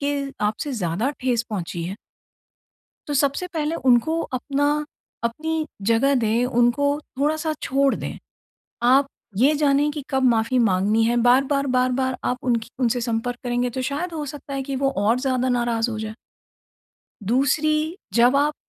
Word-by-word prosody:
के 285 0 0 0.3
आपसे 220 +7 -3
ज़्यादा 205 +3 -1
ठेस 245 -3 +1
पहुँची 175 -4 -4
है। 185 +3 -4 1.1
तो 290 - -1
सबसे 280 +5 +1
पहले 315 -1 -1
उनको 315 +7 +3
अपना 275 +2 -2 0.6
अपनी 315 +6 -1 0.2
जगह 275 +5 +3
दें, 230 -1 +1
उनको 245 +3 +2 0.3
थोड़ा-सा 310 +2 0
छोड़ 275 0 +2
दें। - - -6 0.7
आप 265 +3 +5 0.3
ये 275 +6 +4
जाने 290 0 +2
कि 295 -1 -6
कब 265 -1 0
माफी 230 +3 +1
माँगनी 210 0 +2
है, 235 +2 +2
बार-बार, 275 +2 +3
बार-बार 255 0 +1
आप 250 - 0
उनकी 235 -2 0
उनसे 245 0 +1
संपर्क 235 +1 -2
करेंगे 245 0 0
तो 260 - 0
शायद 340 +5 -3
हो 305 -2 -3
सकता 280 0 -8
है 270 0 -2
कि 275 0 -4
वो 275 - +4 0.2
और 230 +3 +3
ज़्यादा 255 -1 0
नाराज 240 -1 +1
हो 220 - -4
जाए। 220 0 -5 1.1
दूसरी 305 - +1 0.2
जब 245 +3 +5
आप 295 +2 +2
255 Hz, 155 wpm, -23 LUFS, 235-285 Hz, 1.1 s, आप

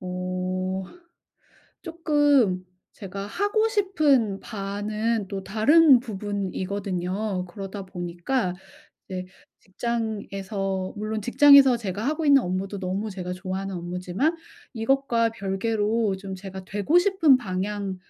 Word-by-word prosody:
어 185 +1 -3 1.0
쪼끔 290 - +2 0.3
제가 195 -2 -7
하고 410 - +1
싶은 300 - +2
바는 210 +1 -2
또 195 -1 -5
다른 265 - +6
부분이거든요. 195 -2 -3
그러다 195 +1 -7
보니까 180 +4 -2 0.6
이제 185 -1 -5 0.3
직장에서 195 -3 -3
물론 215 +1 -3
직장에서 275 +1 +7
제가 205 0 -4
하고 310 +2 -1
있는 280 -1 +7
업무도 190 +3 -3
너무 195 +3 -3
제가 180 -2 -5
좋아하는 190 +1 -4
업무지만 180 - -2 0.4
이것과 235 -1 +1
별개로 210 +1 -1
좀 190 0 -7
제가 190 0 -8
되고 205 - 0
싶은 355 -7 +4
방향을 195 -1 -3
205 Hz, 250 characters per minute, -25 LUFS, 190-240 Hz, 1.0 s, 직장에서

